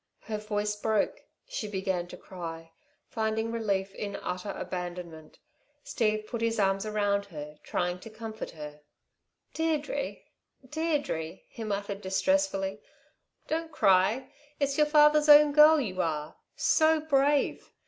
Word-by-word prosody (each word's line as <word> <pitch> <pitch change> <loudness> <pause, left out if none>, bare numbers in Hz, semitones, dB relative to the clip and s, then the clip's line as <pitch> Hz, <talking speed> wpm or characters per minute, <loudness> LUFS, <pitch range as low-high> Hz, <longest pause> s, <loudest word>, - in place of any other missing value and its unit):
Her 215 -1 -4
voice 210 0 -2
broke. 215 0 0 0.3
She - - -4
began 190 -3 -2
to - - -10
cry, 165 -3 -8 0.4
finding 220 0 -1
relief 200 -4 -1
in 200 0 -5
utter 180 +3 -4
abandonment. 175 -4 -6 0.5
Steve 215 -3 0
put 230 +1 -5
his 230 -1 0
arms 195 +1 +1
round 205 -1 0
her, 150 -5 -9
trying 180 0 -2
to 225 - -10
comfort 220 0 -7
her. 150 -1 -9 0.7
"Deirdre! 320 +7 -1 0.5
Deirdre!" 285 - -2
he 230 - -8
muttered 200 -1 -3
distressfully. 195 -1 0 0.7
"Don't 325 +1 -2
cry! 205 +2 +3 0.3
It's 280 -1 +1
your 300 0 +4
father's 300 0 +5
own 295 0 +9
girl 305 +2 +7
you 185 -8 -2
are. 155 -2 -3 0.2
So 315 -1 +3
brave! 285 -1 +1
210 Hz, 130 wpm, -29 LUFS, 185-285 Hz, 0.7 s, own